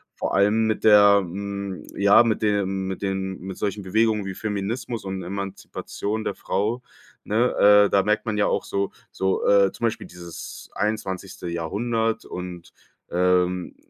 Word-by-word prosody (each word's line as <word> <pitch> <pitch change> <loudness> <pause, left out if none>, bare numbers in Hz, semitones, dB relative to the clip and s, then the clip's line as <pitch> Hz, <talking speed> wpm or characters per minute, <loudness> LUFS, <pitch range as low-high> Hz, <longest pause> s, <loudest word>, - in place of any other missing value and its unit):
Vor - - -3
allem 105 +3 +3
mit 110 - -1
der 100 -1 +7
hm, 100 +1 -5
ja, 100 +3 +6
mit 115 -2 0
dem 95 -2 0
mit 95 -1 -5
dem 95 -1 -3
mit 95 +1 -7
solchen 100 0 -3
Bewegungen 105 +2 +1
wie 95 - -4
Feminismus 110 +2 -3
und 95 -1 -4
Emanzipation 100 +3 -5
der - - -2
Frau, 110 +5 -2 0.4
ne? 105 -2 +5
Äh, - - -9
da 100 - +3
merkt 105 +3 0
man 110 -2 -2
ja 105 - +3
auch - - -1
so 100 0 -2 0.2
so, 95 0 -1
äh 100 -1 +5
zum 115 - -3
Beispiel 115 - -2
dieses 85 -1 -10
21. 95 -3 -3
Jahrhundert 110 +7 -1
und 90 -1 -8 0.4
ähm, 90 0 +1
100 Hz, 155 wpm, -24 LUFS, 95-105 Hz, 0.4 s, der